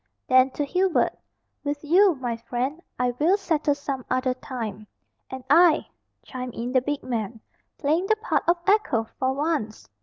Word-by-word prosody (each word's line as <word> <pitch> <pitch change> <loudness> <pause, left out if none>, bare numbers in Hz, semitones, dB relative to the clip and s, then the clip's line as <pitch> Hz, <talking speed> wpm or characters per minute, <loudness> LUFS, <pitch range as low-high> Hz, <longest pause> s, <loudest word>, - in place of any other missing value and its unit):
Then, 255 0 +5
to 290 - 0
Hubert, 365 +5 +1 0.5
"With 290 0 -3
you, 360 +4 +5
my 245 -3 -3
friend, 245 +7 -3 0.2
I 250 0 +1
will 345 +7 +4
settle 310 -7 0
some 275 -2 -4
other 255 0 +1
time." 225 -5 -6 0.4
"And 260 -1 -7
I," 325 +3 +5 0.3
chimed 250 -1 -7
in 240 +2 -4
the 255 -1 +3
big 290 +2 -3
man, 225 -2 -3 0.4
playing 320 +5 0
the 435 - +4
part 440 +2 0
of 345 - +4
echo 395 - +2 0.2
for 260 0 +1
once. 285 -7 -2
275 Hz, 160 wpm, -25 LUFS, 250-325 Hz, 0.5 s, Then